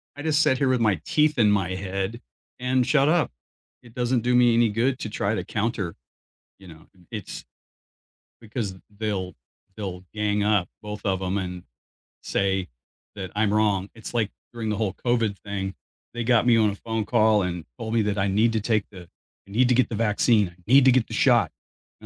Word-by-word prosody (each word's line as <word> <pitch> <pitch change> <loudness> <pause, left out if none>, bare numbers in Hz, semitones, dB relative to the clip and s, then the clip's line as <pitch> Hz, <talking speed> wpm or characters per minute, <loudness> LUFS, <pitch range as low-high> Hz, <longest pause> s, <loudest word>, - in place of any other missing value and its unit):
I - - -13
I - - -5
just 155 -1 +2
sit 130 - +3
here 135 - +1
with 125 -2 +2
my 105 -7 +2
teeth 150 -1 +2
in 110 -4 +4
my 95 -2 0
head 95 +3 -3 0.4
and 125 0 +1
shut 140 0 +3
up. 170 -1 +2 0.5
It 120 -2 -16
doesn't 125 0 0
do 125 +2 +1
me 120 -1 +5
any 115 0 +4
good 125 +5 0
to 110 - -4
try 105 +1 -1
to 90 -3 -3
counter, 105 -5 -2 0.6
you 95 - -14
know, 80 -2 -14
and 90 -3 -24
it's 105 -4 -6 1.0
because 110 -4 -4 0.2
they'll 100 -4 -2 0.4
they'll 95 -4 -6
gang 105 -1 0
up, 105 -4 +2
both 105 0 -6
of 95 -2 0
'em, 95 +1 -1
and 90 -2 -5 0.6
say 95 -1 0 0.5
that 95 -3 -6
I'm 105 -1 +2
wrong. 105 -3 +2
It's 110 +1 -9
like, 110 -4 0 0.2
during 115 -2 -4
the 105 - 0
whole 105 -5 -1
COVID 115 -4 +1
thing, 95 -2 -4 0.4
they 120 0 -3
got 120 0 +3
me 120 -2 +6
on 110 -2 +4
a - - -6
phone 115 +1 -3
call 110 -3 +3
and 90 -2 -3
told 110 0 -5
me 115 - +3
that 105 0 -1
I 100 0 +1
need 105 +4 +3
to 110 - 0
take 105 -1 +1
the 95 -3 -10 0.4
I - - -14
need 125 +4 +3
to 125 - +4
get 130 - +3
the 115 - -3
vaccine, 105 -1 +2
I 85 +1 -21
need 135 0 +7
to 130 - +7
get 125 -2 +2
the - - -8
shot, - - +3 0.5
and - - -12
110 Hz, 210 wpm, -25 LUFS, 100-120 Hz, 1.0 s, need